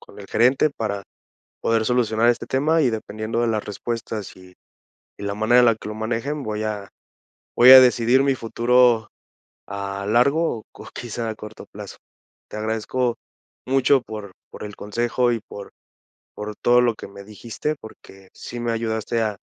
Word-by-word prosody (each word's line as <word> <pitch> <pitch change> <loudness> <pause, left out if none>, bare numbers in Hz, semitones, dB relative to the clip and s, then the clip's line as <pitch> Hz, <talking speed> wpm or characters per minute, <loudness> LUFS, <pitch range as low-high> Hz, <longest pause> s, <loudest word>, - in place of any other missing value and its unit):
con - - -16
el - - -10
gerente 130 +6 +3
para 105 -6 -4 0.6
poder 115 -1 +1
solucionar 115 -1 +2
este 120 - +1
tema 155 +4 +2
y, 125 - +3
dependiendo 110 +1 -4
de 120 - +1
las 110 -2 -1
respuestas 110 -1 -5
y 90 0 -16 0.6
y 100 - -9
la 100 0 -3
manera 110 +3 +4
en 125 - +6
la 115 -2 +4
que 105 - -9
lo - - -5
manejen, 115 +7 -3
voy 110 -3 -3
a 105 -2 -4 0.7
voy 125 +2 +7
a 130 - +12
decidir 125 +1 +4
mi 135 -1 +2
futuro 120 -1 +2 0.6
a 100 0 -5
largo 125 +6 +2
o - - -12
co - - -12
quizá 120 -1 -5
a 110 - -3
corto 105 +1 -10
plazo. - - -9 0.5
Te - - -8
agradezco 115 +3 -1 0.5
mucho 135 0 +3
por 105 -4 -8 0.2
por - - -9
el 105 -1 -8
consejo 120 +3 0
y 115 - -2
por 100 - -9 0.7
por 105 0 -6
todo 120 0 +4
lo 120 -2 +2
que - - -9
me 100 0 -12
dijiste, 115 +8 -5
porque 95 -3 -14
sí 120 - -8
me 120 -1 -1
ayudaste 115 0 -2
a 105 -3 -1
115 Hz, 175 wpm, -22 LUFS, 105-125 Hz, 0.7 s, a